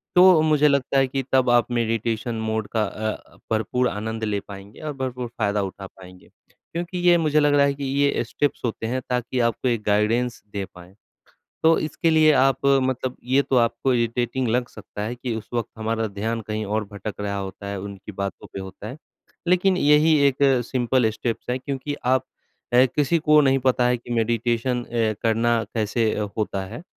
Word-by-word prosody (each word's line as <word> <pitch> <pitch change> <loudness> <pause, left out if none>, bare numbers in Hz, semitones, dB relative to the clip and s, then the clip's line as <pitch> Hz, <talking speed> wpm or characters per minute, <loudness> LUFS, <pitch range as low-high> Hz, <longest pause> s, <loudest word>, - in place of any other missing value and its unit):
तो 180 -2 +7
मुझे 150 -1 +4
लगता 140 -1 +1
है 135 -1 +4
कि 135 +1 -2
तब 130 -2 +4
आप 120 -1 +3
मेडिटेशन 115 0 -1
मोड 110 -1 -2
का 110 - +3
अ, 110 +1 -5
भरपूर 115 +3 +1
आनंद 110 +1 -4
ले 105 -2 0
पाएँगे 100 +1 -11
और 150 -1 -4
भरपूर 125 -2 -4
फ़ायदा 105 -4 -1
उठा 95 0 -7
पाएँगे। 90 -1 -16 0.4
क्योंकि 175 +2 -4
ये 175 -1 +5
मुझे 155 -2 +2
लग 145 -1 +3
रहा 140 0 +5
है 140 - +1
कि 140 - -7
ये 140 -1 +1
स्टेप्स 145 +4 -2
होते 115 -1 -3
हैं 130 +2 -2
ताकि 125 0 -1
आपको 115 +3 -2
एक 115 -3 0
गाइडेंस 115 +4 +1
दे 100 - -2
पाएँ। 90 +1 -14 0.7
तो 165 +1 +5
इसके 160 +2 0
लिए 155 -1 +5
आप 135 0 +2
मतलब 130 -2 +1
ये 130 +3 +3
तो 135 - 0
आपको 120 +2 +2
इरिटेटिंग 120 +1 0
लग 120 +1 0
सकता 105 -1 -9
है 110 +3 -3
कि 120 -1 -4
उस 110 - -8
वक़्त 115 -3 -1
हमारा 110 0 -1
ध्यान 110 +3 -3
कहीं 110 0 -3
और 105 +1 -1
भटक 100 +1 -6
रहा 100 0 -2
होता 100 +1 -7
है, 100 0 -4
उनकी 100 +1 -8
बातों 100 0 -5
पे 100 - -5
होता 95 +2 -8
है। 125 - -7 0.5
लेकिन 185 +1 +3
यही 150 +1 +4
एक 135 - -3 0.3
सिंपल 125 -2 +1
स्टेप्स 115 +2 -4
है, 125 - 0
क्योंकि 140 +2 -4
आप 130 0 +2 0.5
ए, 125 +2 +7
किसी 150 +3 +2
को 150 -1 +5
नहीं 135 -1 +3
पता 130 -1 +2
है 125 0 +2
कि 120 0 -13
मेडिटेशन 120 +2 0
अ, 115 -2 0
करना 115 0 +2
कैसे 110 0 +1
अ, 105 - -2
होता 100 -3 -2
है? 115 - -9
120 Hz, 195 wpm, -23 LUFS, 110-135 Hz, 0.7 s, तो